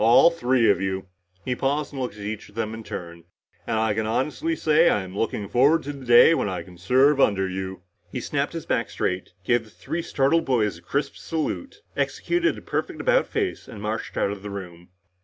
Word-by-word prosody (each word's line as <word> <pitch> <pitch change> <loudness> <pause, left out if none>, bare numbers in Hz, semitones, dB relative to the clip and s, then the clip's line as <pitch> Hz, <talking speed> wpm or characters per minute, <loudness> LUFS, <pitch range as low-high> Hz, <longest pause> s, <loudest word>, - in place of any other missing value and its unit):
All 120 +9 +7
three 125 -7 +2
of 100 - +3
you." 95 0 -2 0.4
He 125 - 0
paused 145 +3 -1
and 135 - -4
looked 125 -5 -3
at 105 - -9
each 105 0 -5
of 100 - -20
them 110 -1 -2
in 110 0 -7
turn. 85 -4 -7 0.4
"And 110 - 0
I 110 -1 +2
can 110 +1 -1
honestly 150 - -1
say 155 - +4
I'm 95 -2 -1
looking 105 -1 -2
forward 140 +9 +4
to 145 - -5
the 135 -2 -10
day 120 +7 +8
when 130 - 0
I 90 -2 -4
can 90 -2 -15
serve 135 +8 +4
under 95 -5 +3
you!" 95 -1 -5 0.3
He - - -3
snapped - - -2
his - - -5
back - - 0
straight, 90 0 -2
gave 120 +4 +2
the 110 - -17
three 135 - -4
startled 160 +2 +2
boys 105 -9 +1
a - - -20
crisp 140 +11 -2
salute, 275 - -4
executed 345 -1 0
a - - -9
perfect - - -3
about - - +3
face 400 -4 -2
and 105 - -9
marched 110 +2 -4
out 100 - +1
of 100 -1 -6
the 105 - -6
room. 90 -3 -8
115 Hz, 215 wpm, -24 LUFS, 95-145 Hz, 0.4 s, day